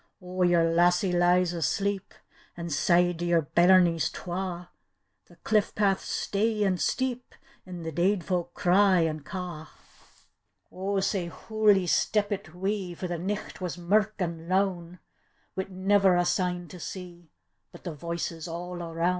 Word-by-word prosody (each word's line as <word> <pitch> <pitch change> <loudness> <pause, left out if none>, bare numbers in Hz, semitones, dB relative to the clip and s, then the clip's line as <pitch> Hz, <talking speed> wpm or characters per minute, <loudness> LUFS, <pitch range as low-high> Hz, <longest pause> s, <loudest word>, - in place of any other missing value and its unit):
"O 185 0 -6
your 175 -2 +4
lassie 175 +3 +3
lies 175 0 +3
asleep, 195 +4 -2 0.4
An' 170 -1 -5
sae 175 +4 +3
do 170 0 -6
your 170 -2 +2
bairncs 175 +1 +4
twa; 180 -1 -5 0.6
The - - -19
diS 215 -2 +2
path's 195 -2 +1
stey 210 +1 0
and 185 -3 0
steep. 250 -1 -2 0.3
An' 180 -2 -7
the 160 - -4
deid 180 +4 +1
folk 175 0 -2
cry 185 0 +4
an' 155 -1 -1
ca'." 160 +1 -7 1.0
O 195 +2 -2
sae 190 -2 -1
hooly 210 +1 +2
steppit 205 -1 0
we, 190 -1 -2
For 180 - -5
the 175 -1 -4
nicht 195 +2 -4
was 180 -1 -4
mirk 210 +4 +1
an' 170 -3 -4
lown, 185 -2 0 0.6
Wi' 190 - -3
never 190 0 +3
a 175 0 +2
sign 180 0 -1
to 180 - -10
see, 175 -2 -8 0.4
But - - -14
the 175 - -5
voices 165 +1 -5
all 175 +1 -6
aroun'. 165 +1 -1
180 Hz, 145 wpm, -27 LUFS, 170-195 Hz, 1.0 s, your